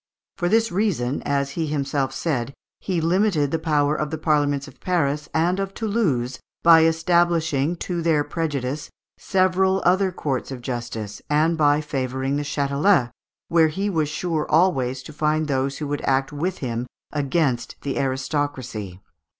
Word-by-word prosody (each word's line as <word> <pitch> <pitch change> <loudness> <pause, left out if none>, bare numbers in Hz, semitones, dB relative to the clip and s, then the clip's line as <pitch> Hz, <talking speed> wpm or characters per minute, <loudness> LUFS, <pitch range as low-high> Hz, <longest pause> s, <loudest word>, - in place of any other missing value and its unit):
For 175 -1 -1
this 225 +1 +3
reason, 175 - 0
as 140 -1 0
he 160 +2 -2
himself 140 -2 -1
said, 135 -4 -2 0.2
he 185 -3 -1
limited 165 -3 +2
the 165 - 0
power 150 -2 +2
of 150 -1 -2
the 160 - -3
Parliaments 145 -2 +1
of 145 - -15
Paris 150 -5 0
and 175 +4 +1 0.2
Toulouse, 170 - 0 0.2
by 165 -1 +7
establishing, 165 -2 +2
to 175 0 -3
their 160 -3 +2
prejudice, 145 -3 -3 0.3
several 190 0 +2
other 185 +2 +3
courts 140 -7 -3
of 130 -3 -7
justice, 120 -4 -5
and 155 +3 +3
by 145 -1 +3
favouring 135 -2 -2
the - - -1
Châtelet, 140 0 +2 0.4
where 165 -1 +4
he 195 +6 -2
was 155 -4 0
sure 155 -1 -2
always 135 -6 +2
to 155 - -10
find 155 +1 0
those 135 -1 -1
who 150 - -4
would 145 0 -3
act 135 +1 0
with 175 +6 -2
him 120 0 -3 0.2
against 140 -3 0
the 140 -2 -2
aristocracy. 130 - -2
150 Hz, 150 wpm, -23 LUFS, 135-170 Hz, 0.4 s, by